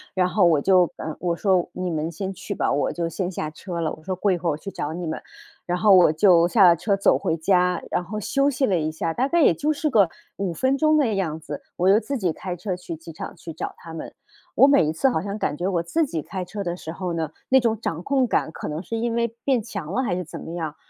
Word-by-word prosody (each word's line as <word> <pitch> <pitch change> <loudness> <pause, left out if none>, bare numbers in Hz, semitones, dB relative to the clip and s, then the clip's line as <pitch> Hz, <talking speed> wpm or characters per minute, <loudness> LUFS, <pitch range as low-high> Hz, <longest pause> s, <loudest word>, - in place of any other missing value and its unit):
然 180 -1 +3
后 195 0 +2
我 160 -4 +4
就 180 +1 +4
呃， 155 -1 -5
我 175 -1 -1
说： 185 -1 +1
“你 185 -1 -3
们 160 +1 -2
先 190 +4 -4
去 - - -6
吧， - - 0
我 145 - +1
就 170 -1 -2
先 180 +2 -3
下 155 -3 -4
车 170 +2 -6
了”， 160 -2 -1
我 155 - -12
说： 185 +1 -3
“过 200 +1 +2
一 180 - +1
会 170 0 -1
儿 - - +3
我 145 - -3
去 195 +5 -8
找 145 - -4
你 175 +2 -5
们。” 160 - -4 0.5
然 180 0 0
后 200 +2 +5
我 180 -4 +7
就 170 0 +5
下 200 +3 +4
了 170 - +7
车 200 +4 0
走 195 - +4
回 165 -4 -1
家， 180 +1 +2
然 180 - 0
后 210 +4 -5
休 275 +7 +1
息 265 0 +1
了 195 - +1
一 155 0 -1
下， 160 +1 -2
大 260 +7 +1
概 340 +3 +2
也 175 - +6
就 300 - 0
是 305 +1 -1
个 205 - +4 0.3
5 195 -3 -2
分 260 +10 +1
钟 310 +2 +3
的 260 -8 +2
样 165 -5 -2
子， 150 -2 -7
我 180 +1 +1
又 200 +3 +6
自 275 +3 -3
己 180 -8 0
开 180 -2 -5
车 185 +1 -3
去 180 -2 -7
机 165 +1 -11
场 - - -7
去 165 - -9
找 160 - -5
他 165 0 -11
们。 160 - -7 0.4
我 270 - +7
每 280 - +5
一 155 - 0
次 210 +12 +2
好 160 - 0
像 200 +2 -4
感 150 - -1
觉 175 +4 -2
我 180 -3 +1
自 315 - +1
己 160 - -3
开 185 +2 -5
车 200 +3 -5
的 175 -2 -2
时 160 -3 -7
候 180 +1 -4
呢， 160 -2 -2 0.2
那 265 0 +6
种 225 -3 0
掌 165 -7 -3
控 265 +5 +1
感 160 - 0
可 - - -6
能 155 +2 -4
是 225 +5 -4
因 235 +1 -1
为 235 0 +1 0.2
变 260 -5 +2
强 195 -6 -6
了 260 - +1
还 230 -9 -1
是 180 - -3
怎 160 - -8
么 - - -8
样， 160 -3 -4
180 Hz, 300 characters per minute, -23 LUFS, 165-215 Hz, 0.5 s, 我